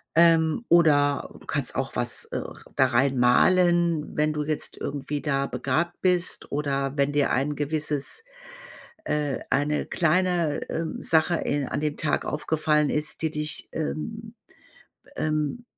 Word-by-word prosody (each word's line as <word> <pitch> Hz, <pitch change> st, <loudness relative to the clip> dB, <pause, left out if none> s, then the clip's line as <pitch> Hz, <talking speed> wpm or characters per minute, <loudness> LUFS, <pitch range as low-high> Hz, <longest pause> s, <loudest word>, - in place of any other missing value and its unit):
Ähm, 165 Hz, +5 st, +4 dB
oder 145 Hz, -4 st, +4 dB
du -, -, -17 dB
kannst -, -, -2 dB
auch -, -, -2 dB
was, -, -, -1 dB
äh, -, -, -4 dB, 0.3 s
da 130 Hz, -, +4 dB
reinmalen, 150 Hz, +7 st, +3 dB
wenn 150 Hz, 0 st, +2 dB
du 150 Hz, 0 st, -2 dB
jetzt 150 Hz, 0 st, -3 dB
irgendwie 145 Hz, +1 st, -4 dB
da 140 Hz, -2 st, 0 dB
begabt 140 Hz, +8 st, -2 dB
bist 180 Hz, -1 st, 0 dB
oder 140 Hz, -2 st, -1 dB
wenn 140 Hz, 0 st, +2 dB
dir 145 Hz, -1 st, +2 dB
ein 140 Hz, +3 st, 0 dB
gewisses 150 Hz, -, -2 dB, 0.8 s
äh, 150 Hz, -, -1 dB
eine 150 Hz, +2 st, +1 dB
kleine, 175 Hz, -2 st, +1 dB
ähm, 160 Hz, 0 st, -4 dB
Sache 160 Hz, +2 st, +3 dB
in 145 Hz, -4 st, -1 dB
an -, -, -2 dB
dem 150 Hz, -1 st, -2 dB
Tag 155 Hz, -, 0 dB
aufgefallen 150 Hz, 0 st, +1 dB
ist, 150 Hz, +1 st, -2 dB
die 160 Hz, -, +1 dB
dich 150 Hz, 0 st, -5 dB
ähm, 220 Hz, +9 st, -4 dB, 0.7 s
be -, -, -21 dB
ähm, 155 Hz, +9 st, -1 dB
150 Hz, 140 wpm, -25 LUFS, 145-165 Hz, 0.8 s, Ähm